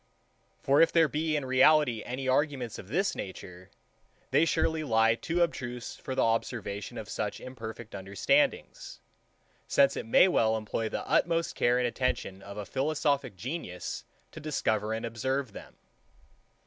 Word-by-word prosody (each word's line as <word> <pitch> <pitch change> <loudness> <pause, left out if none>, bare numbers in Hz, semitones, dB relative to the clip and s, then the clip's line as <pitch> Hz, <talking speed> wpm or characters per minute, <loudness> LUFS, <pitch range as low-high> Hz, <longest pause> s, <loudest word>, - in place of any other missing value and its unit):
For 140 +1 +4
if 165 - +5
there 165 -1 +5
be 155 +1 -1
in 145 -3 -1
reality 130 -2 +4
any 130 +2 -4
arguments 130 -3 0
of 95 - -10
this 190 - 0
nature, 90 -1 -8 0.6
they 145 +5 +4
surely 160 -1 +1
lie 115 -4 +3
too 170 +9 0
abstruse 125 -7 -4
for 130 - -6
the - - +2
observation 115 -3 -2
of - - -6
such - - -3
imperfect 115 -3 -8
understandings; 265 - 0 0.7
since 280 -1 +4
it 230 - -5
may 230 -5 +6
well 110 -11 +2
employ 110 +1 -3
the - - -4
utmost 165 -1 +1
care 120 +1 +2
and 125 - +1
attention 120 -5 -2
of 100 +1 -10
a 105 - -4
philosophic 140 - 0
genius 95 - -5 0.3
to - - -9
discover 110 -8 -1
and 110 +1 -2
observe 130 +2 -2
them. - - -11
130 Hz, 150 wpm, -29 LUFS, 110-155 Hz, 0.7 s, may